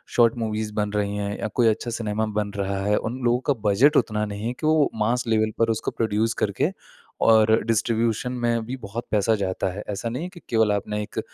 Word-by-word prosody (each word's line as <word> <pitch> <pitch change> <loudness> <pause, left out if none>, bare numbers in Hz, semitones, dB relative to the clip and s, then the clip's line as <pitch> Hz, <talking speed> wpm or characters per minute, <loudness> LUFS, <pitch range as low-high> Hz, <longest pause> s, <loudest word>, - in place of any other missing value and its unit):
Short 115 -1 +5
movies 110 -1 -2
बन 105 -1 0
रही 105 -1 -1
हैं 100 0 -3
या - - -2
कोई 120 -2 +4
अच्छा 110 +2 0
सिनेमा 110 -1 -1
बन 105 -1 -1
रहा 100 -1 -2
है, 105 - +3
उन 120 +4 -3
लोगों 120 +1 +3
का - - +4 0.2
बजट 140 +9 +5
उतना 105 -1 +1
नहीं 105 +1 -6
हैं 120 - -1
कि - - -3
वो 155 -2 +4
मास 115 +3 +1
लेवल 110 -1 +2
पर 115 - +3
उसको 110 - -2
प्रोड्यूस 110 0 0
करके - - +1 0.6
और 110 0 +5
डिस्ट्रीब्यूशन 115 +2 0
में 115 -1 +1
भी 125 +3 -4
बहुत 115 0 -6
पैसा 110 +1 +3
जाता 95 -2 -2
है। 105 - -6
ऐसा 105 +3 -3
नहीं 125 +8 -4
है 180 - -5
की 180 -1 -13
केवल 110 -2 +3
आपने 105 +1 -2
एक - - -6
110 Hz, 220 wpm, -24 LUFS, 105-115 Hz, 0.6 s, Short